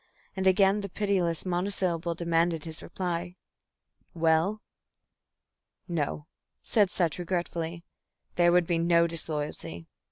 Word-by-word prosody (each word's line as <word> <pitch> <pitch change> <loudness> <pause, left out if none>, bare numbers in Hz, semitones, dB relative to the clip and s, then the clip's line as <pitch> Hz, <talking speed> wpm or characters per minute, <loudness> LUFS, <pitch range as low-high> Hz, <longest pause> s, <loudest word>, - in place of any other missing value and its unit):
And 190 -1 0
again 195 +2 +4
the 200 - -5
pitiless 185 -5 0
monosyllable 175 -2 0
demanded 165 -1 0
his 160 -1 -6
reply. 175 -1 -4 0.8
"Well?" 165 +6 +2 1.2
"No," 150 -3 -2 0.4
said 210 -5 +3
Sutch, 175 -2 -1
regretfully. 170 -1 -3 0.5
"There 175 0 +4
would 175 0 +4
be 170 0 0
no 170 0 +4
disloyalty." 150 - -3
170 Hz, 105 wpm, -28 LUFS, 165-185 Hz, 1.2 s, again